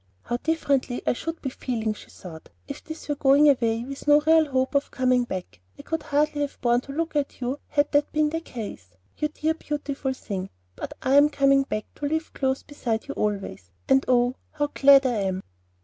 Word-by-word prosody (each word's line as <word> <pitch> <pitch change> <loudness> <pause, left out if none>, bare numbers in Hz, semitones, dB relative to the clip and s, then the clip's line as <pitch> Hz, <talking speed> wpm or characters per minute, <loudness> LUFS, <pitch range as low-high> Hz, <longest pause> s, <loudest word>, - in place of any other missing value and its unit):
"How 240 - -2
differently 280 -4 0
I - - +3
should 330 +6 -6
be 265 - -2
feeling," 225 -5 -2
she - - -14
thought, 160 -4 -11 0.2
"if 280 - -7
this 315 0 -9
were 295 - 0
going 285 +1 +5
away 230 -4 +2
with 275 +2 -8
no 295 0 +7
real 320 0 +4
hope 260 0 0
of 280 0 +1
coming 255 -1 +2
back! 185 - -6 0.2
I - - -11
could 325 0 -3
hardly 295 +1 0
have 285 -1 -3
borne 240 0 +2
to 275 - -10
look 320 +2 -3
at 290 -1 -1
you 255 +3 -3
had 290 0 +1
that 290 0 +2
been 305 -1 +1
the 325 - -1
case, 210 - -8 0.3
you 300 - +1
dear 310 +1 -1
beautiful 285 -3 -3
thing; 195 -6 -5 0.3
but - - -6
I 270 +1 +4
am 290 +1 +7
coming 275 -1 +4
back 215 -6 -3
to 290 - -2
live 315 +2 -2
close 265 -1 -1
beside 235 -6 -3
you - - -4
always, 195 - -3 0.2
and 270 0 +4
oh, 245 0 +3 0.2
how 290 -1 -1
glad 275 -1 +6
I 255 - +2
am!" 190 -1 -2
275 Hz, 210 wpm, -25 LUFS, 240-295 Hz, 0.3 s, no